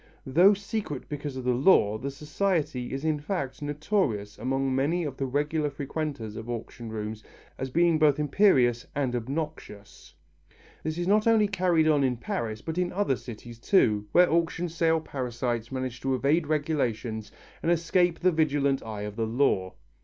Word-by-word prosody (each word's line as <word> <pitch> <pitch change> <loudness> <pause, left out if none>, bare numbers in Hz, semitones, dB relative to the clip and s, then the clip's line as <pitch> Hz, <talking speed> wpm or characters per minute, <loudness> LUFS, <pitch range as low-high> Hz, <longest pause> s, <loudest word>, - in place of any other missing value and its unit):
Though 175 +10 +5
secret 200 - -5
because 145 -2 -5
of 130 - -5
the 125 0 +2
law, 120 - +4
the 140 - -3
society 150 -2 -2
is 135 +3 -4
in 155 -2 +1
fact 145 -4 -4
notorious 145 - -1
among 135 +1 0
many 160 +7 +1
of 145 -4 -4
the 135 - -2
regular 150 +3 0
frequenters 140 -5 -4
of 110 +1 -7
auction 120 0 -6
rooms 110 0 -5 0.4
as 130 - -3
being 170 +3 +3
both 150 -3 +4
imperious 135 - +3
and 135 -3 0
obnoxious. 130 -4 -6 0.7
This 155 +1 -3
is 175 0 -2
not 210 +3 +3
only 220 -2 +5
carried 180 -5 +2
on 150 -3 +4
in 125 -2 +1
Paris 110 -2 -4
but 160 +2 -3
in 180 -1 0
other 195 -8 +1
cities 120 -1 -10
too, 105 - +2
where 180 0 +6
auction 170 +1 0
sale 165 0 +1
parasites 120 -4 -3
manage 130 -2 -4
to 135 -1 0
evade 145 +5 +1
regulations 125 -8 -1 0.3
and 170 - +1
escape 175 +1 +2
the 185 +1 +4
vigilant 145 -4 +1
eye 110 -2 -6
of 105 0 -6
the 115 0 -1
law. 110 -6 +1
140 Hz, 170 wpm, -27 LUFS, 120-165 Hz, 0.7 s, where